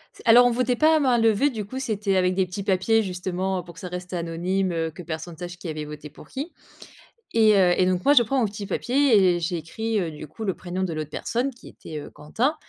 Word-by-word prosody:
C'est - - -13
alors 245 +2 +8
on 245 - +4
votait 250 +1 +1
pas 315 +5 +4
à - - +3
main 255 -4 +3
levée, 225 +5 +3
du 215 -5 -5
coup 260 +6 -6
c'était 210 -6 -1
avec 180 0 +2
des 190 -1 +2
petits 185 +3 -6
papiers, 200 +3 +2
justement, 185 -1 -2
pour 170 - -12
que - - -13
ça 180 - -6
reste 180 +1 -7
anonyme, 180 +2 -1
heu, 165 -1 -2
que 165 - -10
personne 165 0 -6
sache 175 0 -7
qui 175 - -8
avait 155 -1 -4
voté 150 0 -9
pour 150 - -15
qui. 290 +6 -6 0.8
Et 220 -2 +5
heu, 180 -2 +5
et 185 - +4
donc 185 -1 0
moi 285 - +6
je 255 - +7
prends 265 +4 -1
mon 250 - +3
petit 205 -1 -4
papier 260 +3 +2 0.2
et - - -3
j'écrit, 180 +7 -2
heu, 175 -4 -1
du 155 0 -9
coup, 220 +8 -8
le 190 - 0
prénom 180 +1 -5
de 180 -3 -1
l'autre 155 -1 -4
personne 240 - -2
qui 245 - -14
était, 155 -1 -9
heu, - - -10
Quentin. 225 - -1
190 Hz, 255 wpm, -24 LUFS, 175-225 Hz, 0.8 s, alors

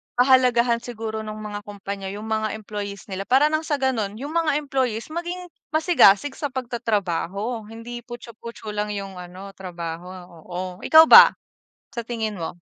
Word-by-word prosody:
pahalagahan 250 -2 +4
siguro 225 -2 -5
nung 215 0 -7
mga 205 -1 -5
kumpanya 200 -1 -6
yung 220 +1 -7
mga 215 0 -1
employees 205 -2 -6
nila 195 +1 -4
para 285 +4 +4
ng 310 - +2
sa 310 -2 0
ganon, 235 -7 -1
yung 280 +6 -6
mga 330 -3 +1
employees 265 -4 -2
maging 345 +1 -5 0.2
masigasig 310 - +4
sa 290 - -1
pagtatrabaho, 225 -3 -2
hindi 230 +2 -8
putchu 240 -1 -9
putchu 230 -2 -8
lang 210 0 -2
yung 195 -2 -6
ano 185 +2 -9
trabaho, 175 -2 -7 0.2
oo. 175 +2 -8 0.2
Ikaw 320 0 +8
ba, - - +10 0.6
sa 235 - -3
tingin 220 -5 -4
mo? 170 +2 -5
220 Hz, 155 wpm, -23 LUFS, 200-260 Hz, 0.6 s, ba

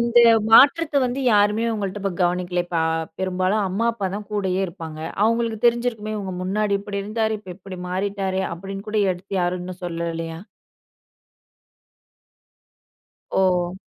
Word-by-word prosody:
இந்த 235 0 +3 0.3
மாற்றத்த 290 +6 +6
வந்து 250 +3 -3
யாருமே 210 +2 +3
உங்கள்ட 205 -1 -3
இப்ப 195 -2 -1
கவனிக்கல? 180 0 0
இப்ப 175 - -3
அ, - - +1 0.3
பெரும்பாலும் 185 +2 0
அம்மா, 215 +6 0
அப்பா 200 -4 -3
தான் 205 0 -6
கூடயே 190 -2 0
இருப்பாங்க. 165 -3 -8 0.2
அவங்களுக்கு 230 -1 +1
தெரிஞ்சிருக்குமே. 235 -3 0
"உங்க 190 -1 -5
முன்னாடி 200 +2 0
இப்படி 200 0 -4
இருந்தாரு. 220 +1 -1
இப்ப 190 - -11
இப்படி 190 -1 -9
மாறிட்டாரே!" 190 0 -1
அப்படின்னு 195 +4 -7
கூட 215 0 0
எடுத்து 180 +3 -12
யாரும் 180 0 0
இன்னும் 180 0 -8
சொல்லலையா? 165 -1 -4 3.0
ஓ! 180 -1 +2
195 Hz, 135 wpm, -22 LUFS, 180-215 Hz, 3.0 s, மாற்றத்த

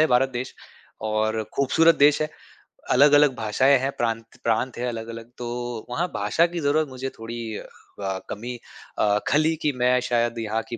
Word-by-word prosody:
है 155 - +6
भारत 130 -1 +3
देश 125 +1 -4 0.5
और 110 0 0
खूबसूरत 165 +4 +4
देश 145 +1 +5
है। 155 - -1 0.6
अलग-अलग 145 +1 +6
भाषाएँ 130 +5 +3
हैं 135 +2 -1
प्रांत 115 -1 -1 0.2
प्रांत 115 +3 0
है 125 +1 -2
अलग-अलग, 115 0 -6
तो 120 -1 -5
वहाँ 165 +9 -1
भाषा 165 - +2
की 175 0 -5
ज़रूरत 155 +1 +1
मुझे 130 0 -5
थोड़ी 115 -1 -5
अ, - - -9 0.3
ब 95 -1 -3
कमी 120 +4 -5 0.4
अ, 105 -1 +3
खली 155 +2 +3
कि 150 - +2
मैं 125 0 +3
शायद 120 -1 +1
यहाँ 110 0 -1
की 120 - -5
120 Hz, 175 wpm, -24 LUFS, 115-140 Hz, 0.6 s, है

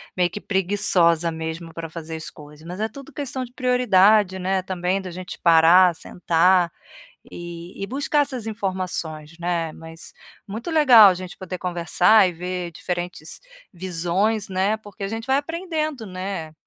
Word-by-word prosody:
meio 180 -1 +2
que 210 - -7
preguiçosa 180 -4 +2
mesmo 160 +1 -6
para 165 -1 -6
fazer 160 0 -7
as 160 - -7
coisas, 150 +1 -15
mas 180 +3 -7
é 220 - 0
tudo 275 +2 -12
questão 270 -2 -4
de 245 - -10
prioridade, 215 -6 +3
né, 190 +1 0
também 185 +1 -2
da 185 - -7
gente 180 +1 -8
parar, 170 +2 +6
sentar, 175 +1 +2 0.6
e 175 +2 -8
e - - -1
buscar 285 +3 0
essas 260 -6 -4
informações, 180 -6 -4
né, 170 -2 -2
mas 165 +1 -10 0.4
muito 220 - -6
legal 255 -10 +8
a - - +2
gente 185 0 -8
poder 185 -1 -6
conversar 180 +3 +3
e - - -2
ver 180 0 -5
diferentes 175 -1 -5 0.3
visões, 185 +4 -1
né, 195 +3 0
porque 205 -2 -11
a - - -1
gente 225 +3 -6
vai 265 +1 +3
aprendendo, 310 -4 -3
né. 185 -3 -5
185 Hz, 160 wpm, -22 LUFS, 170-215 Hz, 0.6 s, legal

